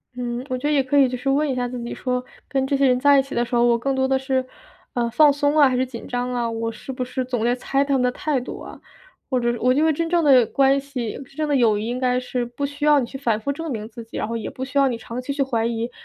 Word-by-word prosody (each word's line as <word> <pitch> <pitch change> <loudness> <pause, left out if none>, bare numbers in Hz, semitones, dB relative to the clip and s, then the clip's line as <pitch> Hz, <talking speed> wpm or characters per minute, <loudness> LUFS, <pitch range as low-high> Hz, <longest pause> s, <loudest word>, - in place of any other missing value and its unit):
嗯， 245 0 -4
我 255 - -1
觉 270 +4 -2
得 - - +1
也 275 -2 +3
可 260 +2 -2
以 270 -2 +5
就 250 - -3
是 250 - -7
问 285 +2 +2
一 260 - -1
下 250 -1 -1
自 245 0 -6
己 235 - -5
说， 250 -1 -2 0.2
跟 270 -1 -1
这 275 - +1
些 275 - +3
人 250 0 +3
在 285 +1 +5
一 - - +2
起 275 - -9
的 240 - +1
时 240 +1 -3
候， 235 - +4
我 240 -1 +4
更 270 +3 -1
多 265 0 +1
的 265 0 +1
是， 265 -1 -1 0.5
啊， 240 -1 0
放 295 +4 +5
松 290 +1 +1
啊， 290 -2 +7
还 255 - 0
是 255 - +2
紧 235 -3 -9
张 245 0 -2
啊？ 240 -1 -1
我 230 0 -3
是 225 +4 -8
不 255 -1 -3
是 255 +1 -3
总 245 -3 -2
在 240 +1 +2
猜 275 +2 0
他 280 0 -1
们 255 - +1
的 250 - +2
态 290 +1 -1
度 250 - -7
啊？ - - -10 0.5
或 255 - +2
者 240 0 +1
我 250 +1 +3
因 290 +4 +2
为 320 - +4
真 330 +2 -1
正 345 -1 +3
的 260 -5 +6
关 275 +4 +3
系、 265 -5 -5
真 275 - -21
正 305 0 -2
的 290 - +2
友 225 -5 +3
谊 220 - -4
应 245 +1 -3
该 250 -1 +1
是 250 -1 -3
不 240 +4 -7
需 285 +1 -3
要 295 -1 +6
你 240 - -2
去 270 - -7
反 230 -5 0
复 280 - -1
证 325 +2 -5
明 220 -2 -5
自 235 +1 -9
己， 225 - -13
然 - - -2
后 230 +1 -3
也 220 - -5
不 260 - -6
需 265 +1 -4
要 275 -1 +5
你 235 -3 -2
长 235 +2 -6
期 265 +3 -4
去 280 - -2
怀 235 -4 0
疑， 230 0 -2
255 Hz, 350 characters per minute, -22 LUFS, 240-275 Hz, 0.5 s, 啊